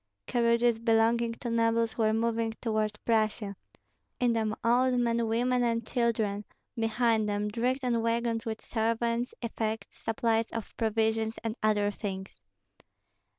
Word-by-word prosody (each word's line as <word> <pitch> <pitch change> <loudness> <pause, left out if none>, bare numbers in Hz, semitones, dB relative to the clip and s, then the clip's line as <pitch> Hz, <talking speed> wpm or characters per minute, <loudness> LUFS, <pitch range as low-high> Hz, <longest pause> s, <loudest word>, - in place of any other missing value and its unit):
Carriages 235 -1 +2
belonging 230 0 +2
to 235 +1 -5
nobles 230 -1 +2
were 220 -2 +2
moving 225 0 0
toward 215 -2 -1
Prussia; 215 -3 +1 0.6
in 245 -2 +3
them 220 -1 0
old 250 +2 +3
men, 235 -1 +1
women, 245 +3 +1
and 230 -1 0
children; 220 -4 0 0.3
behind 225 -1 +1
them, 205 0 -1
dragged 250 +5 -1
on 235 -2 +1
wagons 230 0 0
with 220 -2 -5
servants, 230 +1 0
effects, 225 -1 -3
supplies 225 0 0
of 230 -3 -6
provisions, 220 0 0
and 225 -1 -2
other 210 -1 +2
things. 190 - -6
230 Hz, 130 wpm, -29 LUFS, 220-235 Hz, 0.6 s, in